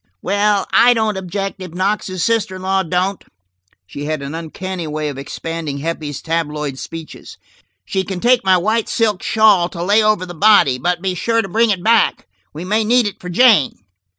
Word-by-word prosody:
"Well, 205 +1 +1
I 245 +1 +6
don't 220 -2 0
object, 190 +1 -5
if 180 -2 -8
Knox's 185 -1 -1
sister 225 -5 0
in 185 - -9
law 190 0 +1
don't." 185 +2 -2 0.6
She 140 +11 -7
had 155 -2 -3
an 140 +2 -6
uncanny 170 +2 -6
way 150 0 -3
of 140 - -7
expanding 160 +1 -5
Heppie's 150 -2 -5
tabloid 150 -4 -3
speeches. 165 -1 -9 0.5
"You 190 -1 -1
can 190 -1 -5
take 245 +4 +3
my 190 -1 +4
white 215 +5 0
silk 215 -5 0
shawl 210 -5 +3
to 170 -2 -6
lay 205 +4 +3
over 215 -3 +1
the 175 - -9
body, 175 -8 +4
but 175 +2 -1
be 190 -1 0
sure 230 +5 0
to - - -5
bring 225 +4 +2
it 185 -4 -1
back. 225 -1 +2 0.3
We 160 +4 -8
may 215 +4 +1
need 240 +2 +3
it 205 - -4
for 180 - -7
Jane." 210 - +4
185 Hz, 190 wpm, -18 LUFS, 165-210 Hz, 0.6 s, I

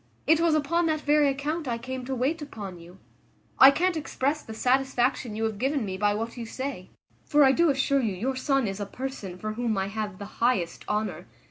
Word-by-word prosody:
It 320 +1 +4
was 335 -2 +3
upon 330 +3 +1
that 310 -1 0
very 295 0 +4
account 295 +3 -2
I 235 -2 -1
came 255 +1 -6
to 265 +1 -3
wait 280 +7 -1
upon 205 -11 -7
you. 175 +2 -14 0.6
I 265 - +11
can't 345 +5 +1
express 300 -1 -1
the 220 - -9
satisfaction 255 -2 +1
you 220 - -2
have 220 -2 -2
given 270 -2 0
me 190 -1 -4
by 205 +1 +1
what 230 +3 -4
you 235 - -5
say; 260 -7 -5 0.3
for 295 0 +4
I 265 - +6
do 335 +4 +3
assure 275 0 +2
you 215 -6 -1
your 255 +8 -2
son 270 0 +1
is 195 +1 -4
a 205 - -4
person 230 -7 -6
for 215 +3 -4
whom 225 -2 -1
I 190 0 -1
have 210 -2 -4
the 200 - -7 0.2
highest 200 -9 +1
honour. 205 -5 -2
255 Hz, 220 wpm, -27 LUFS, 210-280 Hz, 0.6 s, I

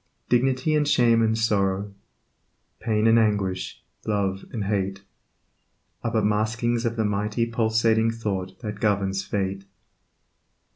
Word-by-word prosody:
Dignity 130 +4 +2
and 150 -1 +2
shame 120 -4 +4
and 110 0 +2
sorrow, 100 -2 0 0.9
Pain 110 -1 0
and 115 +1 +6
anguish, 100 -4 -1 0.2
love 100 -2 -1
and 110 -4 -3
hate 100 -1 -2 1.0
Are 115 - 0
but 110 -2 0
maskings 115 +3 0
of 115 - -3
the 110 -1 0
mighty 105 +3 0
Pulsing 115 0 +2
Thought 95 -5 -4
that 105 -3 -5
governs 100 -2 0
Fate. 100 0 -3
110 Hz, 125 wpm, -24 LUFS, 100-115 Hz, 1.0 s, and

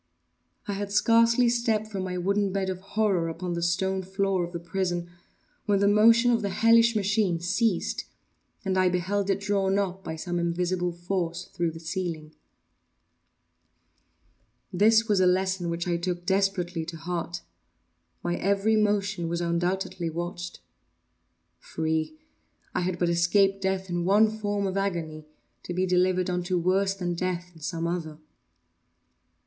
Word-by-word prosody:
I 205 - -2
had 200 0 -4
scarcely 230 +3 +4
stepped 235 -2 +1
from 200 -3 -5
my 180 -1 -3
wooden 200 +2 +1
bed 190 -1 -1
of 185 - -6
horror 195 -4 0
upon 175 +2 -4
the 170 - -3
stone 190 +3 0
floor 190 0 0
of 170 - -5
the 170 - -5
prison, 175 0 -3 0.6
when 205 -1 +3
the 200 +1 +3
motion 230 +4 +5
of 230 -1 +2
the 200 - -1
hellish 230 +3 +4
machine 200 -4 +1
ceased 190 +3 0 0.6
and 190 -1 +1
I 185 -1 +4
beheld 190 +3 -1
it 195 0 +1
drawn 200 -1 +1
up, 190 -1 -2
by 160 - -5
some 175 +2 -3
invisible 175 +1 0
force, 175 0 -3
through 170 -2 0
the 165 0 -9
ceiling. 165 -2 -4 2.4
This 220 +4 +4
was 205 -3 +2
a 185 - +4
lesson 185 -1 +1
which 170 +1 -3
I 175 -1 +1
took 175 0 -3
desperately 190 -3 0
to 165 0 -7
heart. 170 +1 -4 0.8
My 175 0 -1
every 200 +3 +2
motion 200 -5 +1
was 170 0 -1
undoubtedly 175 0 -1
watched. 175 +2 -5 1.0
Free!—I 160 - -5
had 180 0 -1
but 175 0 +1
escaped 195 +3 +3
death 190 0 -1
in 175 -1 -2
one 210 +3 +4
form 205 -2 -2
of 190 0 -2
agony, 165 -6 -3 0.3
to 175 - -6
be 185 +1 +1
delivered 185 0 +2
unto 180 0 -1
worse 190 +3 +1
than 180 -2 -2
death 180 0 -3
in 160 - -17
some 165 +1 -3
other. 165 -3 -3
185 Hz, 150 wpm, -27 LUFS, 175-200 Hz, 2.4 s, motion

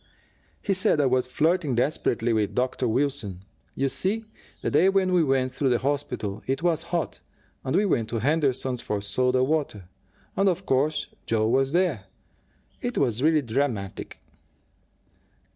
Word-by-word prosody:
"He 200 - +1
said 185 -4 +2
I 145 - +3
was 130 -1 +2
flirting 155 0 +1
desperately 120 -3 0
with 105 -2 0
Dr. 125 0 0
Wilson. 110 -7 -1 0.3
You 135 - +1
see, 205 +10 -1 0.4
the - - 0
day 190 - +5
we 195 -1 +3 0.2
went 135 -3 +1
through 135 0 +1
the 120 - +3
hospital, 135 -7 -2
it 135 +5 -1
was 165 -2 +1
hot, 170 -3 -2 0.4
and 130 +2 -1
we 205 +3 +3
went 115 - 0
to 115 - -2
Henderson's 130 -1 0
for 105 - -2
soda 125 +6 +1
water. 135 - -1 0.5
And, 195 0 +3
of 185 +1 -2
course, 145 +4 +1 0.2
Joe 110 -1 +2
was 135 +3 +2
there. 170 - +1 0.8
It 245 0 -3
was 125 -4 +1
really 155 0 +3
dramatic." 115 -5 -2
135 Hz, 150 wpm, -26 LUFS, 120-160 Hz, 0.8 s, day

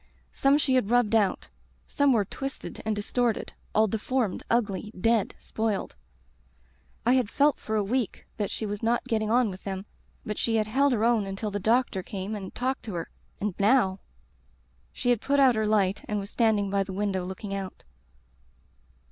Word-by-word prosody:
Some 275 +1 +3
she 285 -3 +1
had 255 -6 +2
rubbed 240 -2 +3
out, 210 -4 +2 0.4
some 285 -1 +2
were 220 -5 +3
twisted 270 +7 -6
and 215 - +1
distorted. 230 +2 -1 0.2
All 215 - +5
deformed, 225 0 -1
ugly, 215 -3 0
dead, 225 0 +2
spoiled. 220 -3 -2 1.1
I 245 - +5
had 255 -5 +2
felt 285 +4 +3
for 220 - -3
a 210 - +2
week 235 +1 -2
that 205 -2 -1
she 220 - -4
was 205 0 -4
not 235 +1 +1
getting 215 -3 0
on 240 -2 +3
with 185 - -10
them, 190 0 -4 0.4
but 210 - -3
she 230 - +1
had 215 -1 +2
held 270 +6 +2
her 225 -1 +1
own 230 -4 +2
until 200 +2 -4
the 205 - -2
doctor 225 -1 +2
came 195 +2 -5
and 195 -2 -6
talked 260 +2 -1
to 210 -5 -5
her, 165 - -4 0.3
and 210 -1 -1
now 200 -3 +3 0.9
"She 245 - 0
had 235 -3 +1
put 280 0 +2
out 265 -2 +6
her 220 -1 0
light 205 -2 +2
and 210 - -1
was 200 +1 -7
stand 225 -3 +3
ing 200 -1 -1
by 200 0 +2
the 195 0 -7
window 195 -1 -1
looking 190 +2 -6
out. 195 -1 -5
215 Hz, 190 wpm, -27 LUFS, 200-240 Hz, 1.1 s, out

